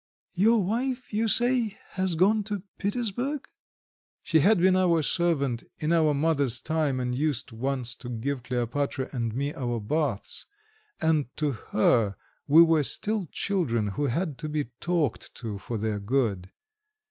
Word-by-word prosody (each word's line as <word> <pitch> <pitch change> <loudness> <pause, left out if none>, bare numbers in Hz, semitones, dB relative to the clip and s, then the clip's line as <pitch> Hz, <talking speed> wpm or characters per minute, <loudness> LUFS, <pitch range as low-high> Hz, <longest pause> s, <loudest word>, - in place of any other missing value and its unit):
Your 210 +3 +4
wife, 245 +5 -2
you 220 +2 +1
say, 240 -1 +2
has 185 -2 0
gone 205 +6 +3
to 205 -3 -4 0.2
Petersburg?" 245 +7 -2 0.8
She 160 - +3
had 205 +8 +5
been 185 +2 +4
our 175 -4 +3
servant 140 -8 0
in 155 +2 0
our 155 -3 +3
mother's 140 -5 +2
time, 155 -2 0
and 125 -1 -1
used 145 -1 -1
once 125 +1 -2
to 120 - -8
give 125 +3 -3
Kleopatra 125 +2 -2
and 115 -3 -2
me 140 +3 -1
our 120 -3 -2
baths, 120 0 -2 0.5
and 155 -4 +2
to 150 -2 +1
her 110 -3 +1 0.3
we 155 +4 +8
were 165 -2 +4
still 210 +6 0
children 120 - 0
who 145 +9 -1
had 145 +1 -2
to 155 - -4
be 150 -5 -2
talked 170 -8 -1
to 110 -4 -5
for 115 +3 -4
their 105 -1 -2
good. 100 -4 -1
150 Hz, 150 wpm, -27 LUFS, 125-185 Hz, 0.8 s, we